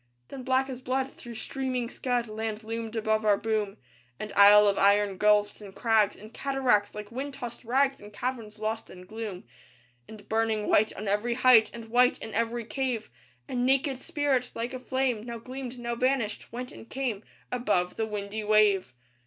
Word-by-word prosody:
Then 270 - -7
black 260 +1 +1
as 260 -2 -7
blood 260 +1 -1
through 235 -1 -10
streaming 255 0 -3
scud 245 -1 -1
Land 220 0 -4
loomed 225 0 -5
above 220 0 +1
our 205 -2 +4
boom, 215 -2 -1 0.4
An 215 - -5
isle 205 +1 +8
of 200 - +2
iron 200 -1 +4
gulfs 210 0 +3
and 195 -2 -11
crags 220 -3 +3
And 215 +3 -13
cataracts, 260 -8 +1
like 210 +1 -7
wind 270 +3 -5
tossed 245 -3 -7
rags, 270 +3 +1
And 205 0 -11
caverns 225 -2 -4
lost 220 +1 -3
in 180 0 -12
gloom. 215 -3 -6 0.6
And 210 -1 -12
burning 220 -1 0
white 215 +1 +4
on 210 - -5
every 210 +4 0
height, 250 -3 +6
And 230 -1 -9
white 245 +2 +4
in 220 - -8
every 230 +1 -1
cave, 250 - -3 0.4
A - - -7
naked 260 +1 +1
spirit, 290 -6 0
like 235 +3 -3
a 255 - -4
flame, 260 -3 -1
Now 235 0 -6
gleamed, 255 +1 -7
now 235 -1 -3
vanished; 245 -3 -1
went 250 +2 -6
and 225 - -12
came 245 -6 -3 0.3
Above 205 -8 0
the 220 - -1
windy 210 0 -4
wave. 205 -10 +3
225 Hz, 180 wpm, -28 LUFS, 210-255 Hz, 0.6 s, isle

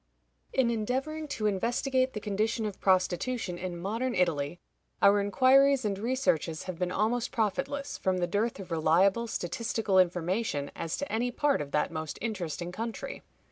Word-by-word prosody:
In 255 -3 +2
endeavoring 265 +8 -2
to 220 -6 -3
investigate 255 +6 +1
the 210 - -3
condition 215 +2 -1
of 205 -2 -5
prostitution 185 +1 +1
in 180 -1 -4
modern 225 +8 -2
Italy, 170 -2 0 0.4
our 200 +1 +5
inquiries 260 +5 +4
and 200 -2 -1
researches 210 - 0
have 185 -2 -6
been 180 -1 0
almost 225 +5 0
profitless, 270 +5 -2
from 185 -1 +1
the 180 - +1
dearth 205 +5 -1
of 185 -2 -9
reliable 185 +8 +3
statistical 220 0 0
information 175 -3 0
as 165 - -3
to 285 - -4
any 235 +3 0
part 285 +3 +1
of 145 - -5
that 150 - +1
most 155 -2 -5
interesting 175 -6 -3
country. 225 +4 -5
210 Hz, 155 wpm, -29 LUFS, 180-245 Hz, 0.4 s, our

